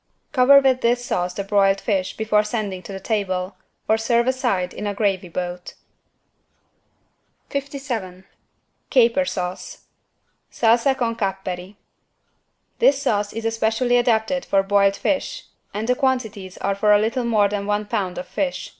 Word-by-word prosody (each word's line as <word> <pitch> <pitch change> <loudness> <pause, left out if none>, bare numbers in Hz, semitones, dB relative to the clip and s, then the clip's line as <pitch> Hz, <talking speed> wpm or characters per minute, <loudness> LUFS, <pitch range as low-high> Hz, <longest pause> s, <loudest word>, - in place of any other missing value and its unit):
Cover 280 +1 +7
with 260 -2 +2
this 240 +1 +1
sauce 180 -4 -2
the 200 - -3
broiled 195 -1 +2
fish 195 -3 -2
before 215 -1 +2
sending 210 -4 -3
to 200 - -10
the 195 - -6
table, 190 -3 -2 0.3
or 220 0 +3
serve 235 +1 +2
aside 245 -9 0
in 210 - -5
a 205 - -3
gravy 195 -4 0
boat. 180 +1 -5 1.8
57 260 -10 -5 0.6
CAPER 255 +1 +4
SAUCE 180 -7 -5 0.7
(Salsa 240 +4 +3
con 230 -2 -1
capperi) 195 -2 -4 1.0
This 285 - +4
sauce 205 -6 0
is 225 0 -6
especially 225 +2 +1
adapted 240 +2 +1
for 195 -1 +2
boiled 200 0 +3
fish - - -2 0.3
and 215 +2 -4
the 250 - +4
quantities 220 -8 -2
are 200 - -1
for 210 +2 +2
a - - +7
little 230 +4 0
more 215 -3 +3
than 200 0 -3
one 210 0 0
pound 200 -4 -2
of 270 - -5
fish. 275 -2 -3
215 Hz, 145 wpm, -22 LUFS, 195-245 Hz, 1.8 s, Cover